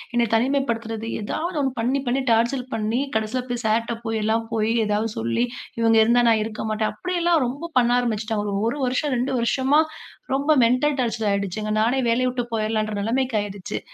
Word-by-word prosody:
என்ன 240 0 +3
தனிமைப்படுத்துறது 230 -3 0
எதாவது 335 - -3
ஒன்னு 270 - 0
பண்ணி 255 +5 +1
பண்ணி 255 +3 +1
டார்ச்சர் 235 +3 +2
பண்ணி 225 +3 0 0.2
கடைசியில 220 +4 -1
போய் 245 0 -3
சார்ட்ட 230 +2 +1
போய் 225 -1 -2
எல்லாம் 225 +1 +1
போய் 220 0 +1
ஏதாவது 210 +1 0
சொல்லி 115 - 0 0.4
இவுங்க 225 0 +4
இருந்தா 240 +2 +4
நான் 220 -1 +3
இருக்க 215 0 -5
மாட்டேன். 215 0 0
அப்பிடி 365 +12 -4
எல்லாம் 340 -4 +3
ரொம்ப 280 +7 -5
பண்ண 240 -1 +2
ஆரம்பிச்சிட்டாங்க. 215 -3 -2
ஒரு 285 - -4
வருஷம், 260 +3 0
2 250 +3 -1
வருஷமா 265 +5 +2 0.6
ரொம்ப 285 +3 +1
மெண்டல் 260 +5 +2
டார்ச்சர் 225 -3 -1
ஆயிடுச்சுங்க. 200 +2 -2
நானே 245 +4 +2
வேலைய 250 +2 +2
விட்டு 245 -1 -2
போயிர்லான்ற 215 -1 -1
நிலைமைக்கு 245 +2 0
ஆயிடுச்சு. 200 -2 -5
230 Hz, 170 wpm, -23 LUFS, 215-255 Hz, 0.6 s, இவுங்க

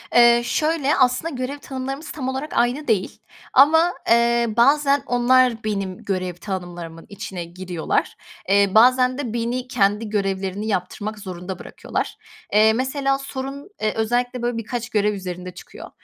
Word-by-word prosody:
Eee, 240 0 +7
şöyle, 300 +2 +1
aslında 260 +5 +2
görev 255 +3 -4
tanımlarımız 270 +2 -6
tam 260 -4 -5
olarak 265 +4 -4
aynı 245 +5 +1
değil 210 -5 0 0.3
ama, 320 +6 +5 0.2
eee, 235 0 +4
bazen 280 +3 +4
onlar 245 -1 +3
benim 195 -3 -3
görev 185 -2 -2
tanımlarımın 175 -3 -7
içine 195 -4 -6
giriyorlar, 175 -1 -3 0.3
eee, 200 0 +4
bazen 255 +2 +5
de 245 -6 -4
beni 240 +2 -2
kendi 210 -2 +1
görevlerini 195 0 -2
yaptırmak 205 +2 -3
zorunda 185 -1 -7
bırakıyorlar. - - -5 0.4
Eee, 215 +1 +6
mesela 270 +3 0
sorun, 275 +4 -7
eee, 215 -1 +1
özellikle, 245 +2 -1
böyle, 240 -1 -1
birkaç 235 +1 -4
görev 210 -2 +1
üzerinde 180 -2 -6
çıkıyor. 180 - -11
235 Hz, 140 wpm, -22 LUFS, 195-260 Hz, 0.4 s, Eee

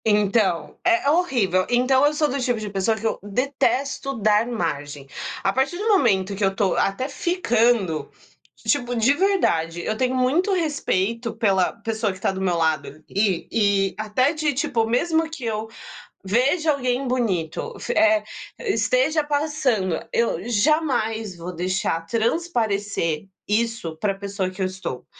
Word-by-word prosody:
Então, 205 -6 +2
é 350 -4 +3
horrível. 235 - +2
Então 255 +3 +3
eu 295 - +3
sou 300 0 +2
do 275 - -2
tipo 245 -3 0
de 215 -1 -5
pessoa 200 +3 0
que 220 - -7
eu 220 - 0
detesto 275 +5 -1
dar 215 +1 +3
margem. 145 - -4 0.4
A 195 - +2
partir 270 +6 0
do 420 +4 -3
momento 205 - +3
que 205 - -3
eu 195 0 +2
tô 200 -2 +1
até 195 +7 0
ficando, 235 - +1 0.6
tipo 245 -4 0
de 235 +4 +4
verdade, 175 - +1
eu 215 - -1
tenho 255 +3 0
muito 295 +10 +2
respeito 235 - -1
pela 195 -5 +2
pessoa 220 -2 -1
que 185 - -10
tá 195 - +1
do 190 0 -5
meu 180 -3 +1
lado 160 -3 +1
ali 190 +4 -2
e 200 -3 +2
até 220 +7 +1
de, 305 -2 0
tipo, 235 -4 0
mesmo 320 +7 +1
que 300 -6 -7
eu 220 -1 -2 0.6
veja 275 - +2
alguém 255 -1 -1
bonito, 195 -11 -1
fi - - -3
eh, 325 0 +4 0.4
esteja 400 -7 +1
passando. 285 - 0
Eu 230 -5 0
jamais 225 - +1
vou 175 +2 -6
deixar 180 -1 -1
transparecer 215 - -1 0.2
isso 220 -6 -1
pra 195 +4 -1
pessoa 195 -1 -3
que 185 +1 -12
eu - - +2
estou, 185 -9 -6
225 Hz, 150 wpm, -23 LUFS, 195-280 Hz, 0.6 s, de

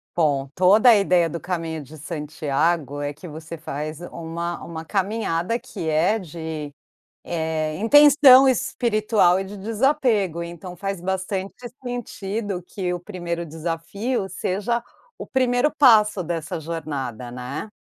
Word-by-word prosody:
Bom, 140 -5 +1
toda 205 +7 +6
a 225 - +8
ideia 180 -4 +3
do 170 +2 -5
caminho 165 -3 -4
de 150 +3 -12
Santiago 150 -1 -1
é 145 0 -3
que 170 +4 -11
você 160 +2 -8
faz 155 0 -5
uma 170 0 -5
uma 160 -1 -7
caminhada 195 +1 -1
que 240 -9 -7
é 170 +8 +2
de, 160 -4 -6 0.5
eh, 160 -2 -2
intenção 275 +3 +7
espiritual 220 -7 +2
e 195 - -1
de 200 +2 -9
desapego, 220 - +1
então, 170 +1 -8
faz 195 -2 -4
bastante 190 +1 -3 0.3
sentido 205 -5 -4
que 180 -3 -3
o 175 - -5
1º 175 -3 -4
desafio 170 - -3
seja 210 +5 -1 0.4
o - - -8
1º 255 +1 +2
passo 210 - +5
dessa 165 0 -3
jornada, 145 -7 -5
né. 125 - -6
175 Hz, 130 wpm, -23 LUFS, 160-210 Hz, 0.5 s, a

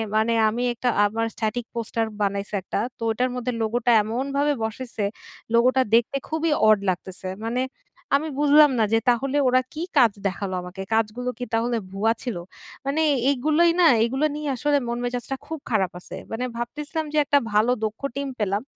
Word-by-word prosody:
মানে 220 +2 +3 0.2
আমি 235 +3 -2
একটা 245 +1 -1 0.2
আমার 225 +2 -1
static 230 +1 -2
পোস্টার 230 0 -1 0.2
বানাইছে 200 0 -1
একটা। 185 - -4 0.2
তো - - -30
ওটার 250 +3 0
মধ্যে 250 0 -2
লোগো 225 +2 0
টা 245 - +5
এমনভাবে 275 +6 0
বসাইছে 220 -1 -4 0.5
লোগোটা 255 +3 +4
দেখতে 240 +4 +2
খুবই 315 +1 0 0.2
অড 215 0 +7
লাগতেছে। 185 +1 -4 0.2
মানে 240 +3 -1 0.5
আমি 305 +3 0
বুঝলাম 295 +1 +6
না - - +4
যে 225 - +5
তাহলে 270 +4 +1
ওরা 255 0 +4
কী 320 +2 -4
কাজ 240 -5 +6 0.2
দেখালো 190 0 -4
আমাকে। 180 +2 -8
কাজগুলো 225 +3 0
কী 250 - -3
তাহলে 235 +1 +1
ভুয়া 210 +4 +1
ছিল? 245 -4 -3 0.5
মানে 280 +3 0 0.3
এইগুলোই 305 +5 +3
না - - +6 0.2
এইগুলো 265 +6 +1
নিয়ে 300 -1 -3
আসলে 290 +3 +2
মন 235 - -2
মেজাজটা 245 +2 -3
খুব 320 -1 -5
খারাপ 195 -6 +1
আছে। - - -9 0.2
মানে 225 +3 -3
ভাবতেছিলাম 300 +7 -4
যে - - 0
একটা 285 - +4 0.2
ভালো 215 +4 +4
দক্ষ 215 0 -5
টিম 280 0 -2
পেলাম, 205 -1 0
240 Hz, 175 wpm, -24 LUFS, 220-275 Hz, 0.5 s, অড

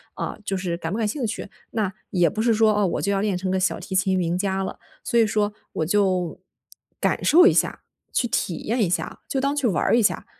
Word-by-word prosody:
啊， - - -4
就 195 - -1
是 180 -2 -2
感 165 -1 -4
不 205 - -2
感 225 - 0
兴 245 +4 -2
趣。 215 - -5 0.2
那 210 -4 -1 0.2
也 175 -2 +3
不 215 - -3
是 230 0 +3
说， 220 0 +4
哦， 205 -2 +2
我 - - -2
就 200 - 0
要 195 - +1
练 200 -3 0
成 185 0 -2
个 190 - +1
小 185 - +1
提 - - -7
琴 190 0 +2
名 175 -1 0
家 195 0 -1
了， - - -6 0.2
所 235 - +1
以 225 - +4
说 210 0 0 0.2
我 160 - -1
就 185 -2 +1 0.6
感 - - 0
受 355 +4 +7
一 - - +6
下， - - +1 0.3
去 245 - +1
体 180 - -1
验 235 +3 +1
一 195 - +2
下， 175 - -3
就 270 - 0
当 275 +1 +1
去 280 -4 +1
玩 185 -7 +1
儿 - - +3
一 - - +4
下。 210 - +1
200 Hz, 270 characters per minute, -23 LUFS, 185-220 Hz, 0.6 s, 受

